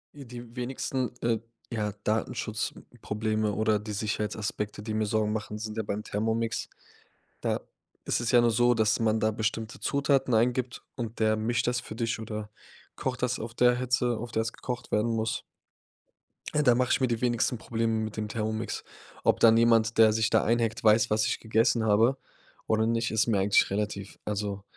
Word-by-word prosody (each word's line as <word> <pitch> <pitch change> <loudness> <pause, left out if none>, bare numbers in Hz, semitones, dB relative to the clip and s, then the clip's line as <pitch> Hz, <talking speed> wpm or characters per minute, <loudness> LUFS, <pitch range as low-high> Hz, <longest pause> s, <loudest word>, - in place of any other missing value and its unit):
Äh, 140 -2 -10
die 120 -1 -10
wenigsten, 130 0 -2
äh, 115 -1 +1 0.3
ja, 105 -3 -2
Datenschutzprobleme 110 0 -2
oder 110 0 +2
die 105 0 -6
Sicherheitsaspekte, 105 0 -3
die 110 0 -4
mir 110 0 +1
Sorgen 105 0 0
machen, 105 -1 -4
sind 110 0 -6
ja 110 - 0
beim 105 +1 -3
Thermomix. 110 +2 -1 0.7
Da - - -1 0.4
ist - - 0
es 120 - -1
ja 120 - +7
nur 120 0 +3
so, 120 +2 +4
dass 110 -1 +2
man 110 -1 +1
da 110 - +2
bestimmte 110 +3 -3
Zutaten 135 -3 +1
eingibt 120 +2 +1
und 115 -2 -5
der 110 0 +3
mischt 115 +2 0
das 125 0 0
für 115 - -9
dich 115 -1 -1
oder 110 -1 -6 0.5
kocht 125 -2 -3
das 125 0 0
auf 115 +1 -6
der 125 0 +4
Hitze, 125 -1 +1
auf 120 +1 -7
der 110 - +1
es 115 - -3
gekocht 120 -2 -6
werden 110 +2 +1
muss. 110 -1 -1 1.1
Da 145 -5 +4
mache 125 +1 +1
ich - - +3
mir 130 - +2
die 115 -2 -2
wenigste 120 0 +1
Probleme, 115 0 -1
mit 110 0 -6
dem 105 0 -2
Thermomix. 110 +1 -3 0.4
Ob - - +3
dann 115 -1 +7
jemand, 115 -1 +4
der 110 -1 +7
sich 110 0 +1
da - - +3
einhackt 115 +2 0
weiß, 110 +1 +5
was 105 0 +2
ich - - -1
gegessen 115 +1 +2
habe 110 +5 +4 0.5
oder 110 0 +2
nicht, 115 0 0
ist 110 +1 +2
mir 110 -4 +2
eigentlich 100 +1 +4
relativ. 100 0 -3
Also, 100 -1 -3
110 Hz, 185 wpm, -28 LUFS, 110-120 Hz, 1.1 s, ja